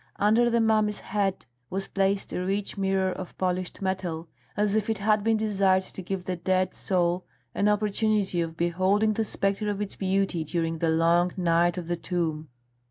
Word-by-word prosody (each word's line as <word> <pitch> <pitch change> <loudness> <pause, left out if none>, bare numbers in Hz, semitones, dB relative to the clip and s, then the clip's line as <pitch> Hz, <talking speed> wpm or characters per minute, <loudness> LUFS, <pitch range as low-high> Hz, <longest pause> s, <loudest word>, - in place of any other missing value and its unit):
Under 220 +4 +3
the 235 0 +2
mummy's 215 -2 +2
head 195 -3 -1 0.2
was 195 +1 -3
placed 195 0 0
a 180 - -2
rich 195 +2 -2
mirror 190 -1 +1
of 185 -1 -7
polished 185 +1 -2
metal, 180 -4 -2 0.3
as 210 0 +2
if 220 0 0
it 220 - +1
had 210 +1 +2
been 225 0 +3
desired 195 -3 +2
to 190 - -9
give 185 0 -4
the 185 - -2
dead 185 +2 0
soul 180 -1 0 0.3
an 200 - +1
opportunity 210 -3 +1
of 165 -1 -4
beholding 185 +6 +2
the 225 - 0
spectre 200 0 -1
of 205 -1 -2
its 205 -1 -4
beauty 190 -3 0
during 165 +1 -2
the 165 - +1
long 170 +2 +3
night 175 0 +2
of 175 -2 -5
the 175 0 -1
tomb. 160 -3 -2
190 Hz, 180 wpm, -27 LUFS, 175-205 Hz, 0.3 s, Under